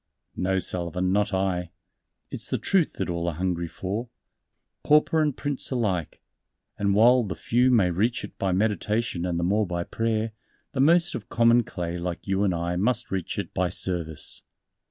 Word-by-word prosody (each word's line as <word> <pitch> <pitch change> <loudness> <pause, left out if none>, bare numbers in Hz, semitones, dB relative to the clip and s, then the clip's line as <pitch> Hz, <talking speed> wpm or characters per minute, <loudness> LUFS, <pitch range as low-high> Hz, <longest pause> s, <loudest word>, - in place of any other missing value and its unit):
"No, 95 +1 0
Sullivan, 90 0 -1
not 105 +2 +2
I; 95 -2 -1 0.6
it's - - -5
the - - 0
Truth 185 -5 +1
that - - -3
all 85 -1 -2
are 85 - -1
hungry 85 -1 -1
for 100 +8 -4 0.7
Pauper 150 +1 +4
and 150 -4 0
Prince 145 -2 -2
alike 100 - -2 0.5
and 100 -1 +1
while 120 +4 +6
the 95 -6 -4
few 125 +9 +2
may 105 -8 +4
reach 115 +8 0
it 105 - -8
by 95 - +1
meditation 105 -1 0
and 85 -1 -1
the - - -1
more 105 +3 +2
by 85 -1 -2
prayer, 115 +2 -1 0.4
the 140 - -4
most 170 +6 +4
of - - -6
common 115 +1 +5
clay 85 -4 -4
like 85 -1 -4
you 95 +1 +1
and 95 -4 +1
I 85 +1 -2
must 120 +4 0
reach 95 -3 -3
it - - -4
by 90 0 +1
service." 85 -4 -2
95 Hz, 175 wpm, -26 LUFS, 90-115 Hz, 0.7 s, while